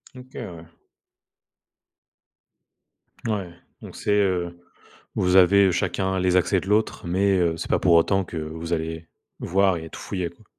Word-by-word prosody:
OK, 130 +1 -13
ouais. 85 -2 -7 2.6
Ouais, 100 -5 -2 0.3
donc - - -11
c'est, - - -2
heu, 90 -4 0 0.6
vous 90 +1 +1
avez 95 +1 +6
chacun 95 +2 -1
les 90 0 +2
accès 90 +1 +3
de 95 - -9
l'autre 105 -3 0
mais, 95 +2 +2
heu, 85 -2 +1
c'est - - -6
pas - - +3
pour 85 - +3
autant 95 +4 +3
que 85 - -7
vous 80 +2 -5
allez 80 0 -4 0.3
voir 95 0 +2
et 80 0 -8
tout - - -10
fouiller, 90 -4 -4
quoi. 100 +5 -22
90 Hz, 155 wpm, -24 LUFS, 85-100 Hz, 2.6 s, avez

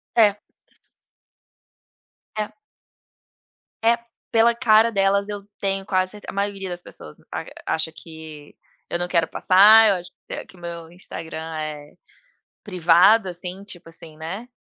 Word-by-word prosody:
É. 210 -3 +4 2.0
É. 210 - -2 1.3
É, 230 +1 +4 0.3
pela 230 +1 +4
cara 230 -1 +4
delas 200 0 +1
eu 205 -1 -5 0.2
tenho 195 -1 -1
quase 185 -1 +1
cer 210 -1 -12
a - - -6
maioria 200 -1 -3
das 175 0 -6
pessoas 75 - -12
arg - - -5 0.2
acha 160 0 -1
que 160 -2 -12 0.3
eu 175 - -1
não 175 - -1
quero 170 -2 +2
passar 215 +4 +7
eu 195 - +3
acho 175 0 -8 0.4
que 190 - -17
meu 170 -1 -8
Instagram 160 -2 -7
é 150 -1 -6 0.7
privado 185 +2 +4
assim 180 +2 -5
tipo 175 -4 -9
assim 165 -1 -10
né, 185 +9 -6
185 Hz, 130 wpm, -22 LUFS, 165-205 Hz, 2.0 s, passar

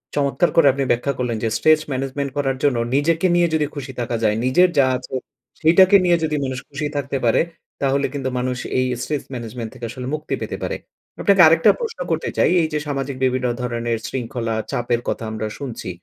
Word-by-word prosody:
চমৎকার 145 +5 +2
করে 165 -4 +6
আপনি 140 0 -1
ব্যাখ্যা 125 +4 0
করলেন 120 -3 -1
যে, 115 - +2
স্ট্রেচ 155 0 +4
ম্যানেজমেন্ট 135 +1 -2
করার 135 -2 0
জন্য 140 -4 +3 0.2
নিজেকে 165 +5 +2
নিয়ে 175 0 +4
যদি 155 -1 +2
খুশি 140 -2 -6
থাকা 120 0 -2
যায়, 105 -1 +3
নিজের 180 +8 +4
যা 135 - +6
আছে, - - -8 0.4
সেইটাকে 185 +5 +6
নিয়ে 175 -1 +4
যদি 155 -1 0
মানুষ 130 0 -3
খুশি 145 +1 -3
থাকতে 140 0 -2
পারে, 115 - +4 0.4
তাহলে 140 0 +1
কিন্তু 135 -2 -2
মানুষ 125 0 -2 0.2
এই 130 - +2 0.2
স্ট্রেস 150 +1 -2
ম্যানেজমেন্ট 115 -1 -5
থেকে 120 -2 -7
আসলে 125 +2 -6
মুক্তি 155 0 -5
পেতে - - -4
পারে। - - -2 0.5
আপনাকে 195 -3 +5
আরেকটা 165 +1 +6
প্রশ্ন 460 -1 -5
করতে - - -1
চাই। - - +4
এইযে, 155 -1 -1
সামাজিক 135 -1 -3
বিভিন্ন 130 -1 0
ধরনের 120 -1 -2
শৃঙ্খলা, 115 -2 -3 0.2
চাপের 120 0 0
কথা - - -2
আমরা 110 0 -3
শুনছি। 125 -8 -6
135 Hz, 190 wpm, -21 LUFS, 125-155 Hz, 0.5 s, করে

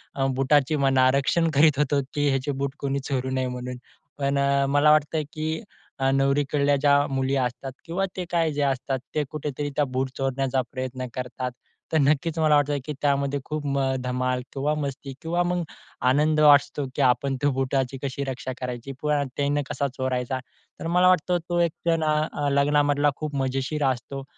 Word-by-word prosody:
अ, 135 - 0
बुटाची 140 +2 +3
म्हणा 130 -1 +4
रक्षण 165 +5 +2
करीत 145 -1 +5
होतो, 145 -1 +2
की 145 -2 +1
ह्याचे 135 +1 0
बूट 140 -1 -2
कोणी 140 0 -1
चोरू 130 -1 -1
नये 130 -1 -1
म्हणून, 125 0 -5 0.4
पण 140 0 0 0.3
मला 145 +1 +5
वाटतं 155 +1 +2
की 155 0 -3 0.5
अ, 135 0 +2
नवरीकडल्या 140 +1 +2
ज्या 145 0 +5
मुली 135 0 0
असतात 125 +2 -5
किंवा 180 +4 -1
ते 180 - -2
काय 165 -2 +2
ज्या 145 -1 +1
असतात, 130 0 -2 0.2
ते 150 - +2
कुठेतरी 145 -1 -3
त्या 150 - +2
बूट 130 0 -2
चोरण्याचा 135 0 0
प्रयत्न 130 -1 -4
करतात. 125 0 -4 0.4
तर - - +4
नक्कीच 150 +3 +2
मला 155 -1 +4
वाटतं, 145 0 +2
की 150 - -4
त्यामध्ये 140 -1 +1
खूप 155 -1 -4
म 140 0 0 0.2
धमाल 125 0 -1
किंवा 140 +2 0
मस्ती 140 -2 -4
किंवा 170 +2 0
मग 175 0 -1 0.5
आनंद 150 +3 +3
असतो, 145 -1 +5
की - - 0
आपण 130 +2 +2
त्या 145 - +3
बुटाची 135 0 0
कशी 140 0 -3
रक्षा 130 -1 -4
करायची? 125 +1 -5
प 150 - 0 0.3
त्यांना 145 +1 +1
कसा 140 - -1
चोरायचा? 130 -1 -1 0.4
तर 165 - -4
मला 180 +2 +4
वाटतं, 180 0 +3
तो 175 0 +1
एक 170 -1 +3
क्षण 165 -1 +2
ना 155 -1 0
लग्नामधला 145 +1 +3
खूप 150 -1 -5
मजेशीर 135 +2 -1
असतो 135 +1 -2
140 Hz, 175 wpm, -25 LUFS, 130-150 Hz, 0.5 s, करीत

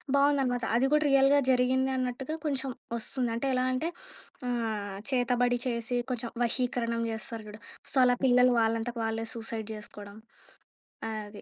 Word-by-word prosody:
బావుందనమాట. 275 -4 +2
అది 260 - +3
కూడా 300 - +4
రియల్‌గా 275 +1 +6
జరిగింది 260 +1 +2
అన్నట్టుగా 255 +4 -2
కొంచెం 270 -1 -1 0.3
ఒస్తుంది. 245 +1 -2
అంటే 270 +4 -1
ఎలా 255 - +1
అంటే 305 +6 -1 0.6
ఆహ్, 215 -5 -2
చేతబడి 245 -1 +2
చేసి 240 0 -1
కొంచెం 235 -1 -3
వశీకరణం 235 -1 0
జేస్తారు 225 0 -5
చూడు. 210 +1 -10 0.3
సో, - - -6
అలా 245 0 +4
పిల్లలు 250 -1 +5
వాళ్ళంతట 225 +2 0
వాళ్ళే 225 0 -2
సూసైడ్ 225 -1 -5
జేసుకోవడం 205 0 -9 0.9
అది 210 -1 -6
245 Hz, 135 wpm, -29 LUFS, 225-260 Hz, 0.9 s, రియల్‌గా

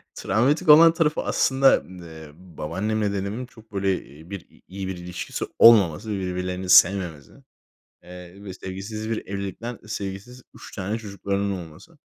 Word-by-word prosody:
travmatik 140 +7 0
olan 165 +2 +9
tarafı 160 -3 0
aslında, 135 0 +3
eee, 80 -4 -11
babaannemle 95 +5 -3
dedemin 100 +6 -4
çok 110 -3 -19
böyle 95 -1 0 0.3
bir 100 -3 -6
i - - -24
iyi 95 0 -6
bir 95 -2 -5
ilişkisi 90 0 -5
olmaması, 105 -3 +6
birbirlerini 90 -1 -4
sevmemesi, 90 -6 +4 0.7
eee, 90 +2 -12
ve 95 - -7
sevgisiz 100 +4 -7
bir 110 - -3
evlilikten, 100 +4 -5
sevgisiz 105 +4 -6
3 - - -12
tane 105 +2 -3
çocuklarının 100 -1 -3
olması. 80 -1 -17
100 Hz, 135 wpm, -24 LUFS, 90-110 Hz, 0.7 s, olan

